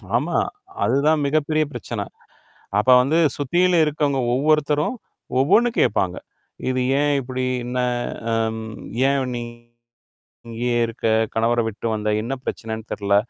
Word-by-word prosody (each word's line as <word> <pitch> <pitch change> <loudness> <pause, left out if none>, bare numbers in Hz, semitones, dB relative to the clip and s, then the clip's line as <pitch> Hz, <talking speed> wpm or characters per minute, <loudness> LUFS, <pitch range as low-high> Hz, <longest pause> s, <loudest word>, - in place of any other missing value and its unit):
ஆமா, - - 0 0.5
அதுதான் 150 +3 +3
மிகப் 145 +1 +1
பெரிய 155 0 +2
பிரச்சனை. 120 -6 -4 0.7
அப்ப 105 +5 +2
வந்து 140 +6 +1 0.2
சுத்தியிலும் 175 +4 +3
இருக்கவங்க 145 -2 0
ஒவ்வொருத்தரும், 150 - +2 0.4
ஒவ்வொண்ணு 205 - +4
கேப்பாங்க. 90 -3 +1 0.5
இது 130 0 0 0.2
ஏன் 145 0 +2
இப்புடி? 130 0 -3 0.2
என்ன? 125 +1 -2 0.5
அம் 110 0 0 0.5
ஏன் 135 -2 0
நீ 120 - -3 1.1
இங்கே 115 +2 -2 0.2
இருக்க? 115 0 -5 0.3
கணவரை 115 +1 +2
விட்டு 110 +1 -6
வந்த? 105 0 -2
என்ன 120 +4 -4
பிரச்சனைன்னு 110 -1 -5
தெர்ல! 100 -1 +1
130 Hz, 120 wpm, -22 LUFS, 115-150 Hz, 1.1 s, ஒவ்வொண்ணு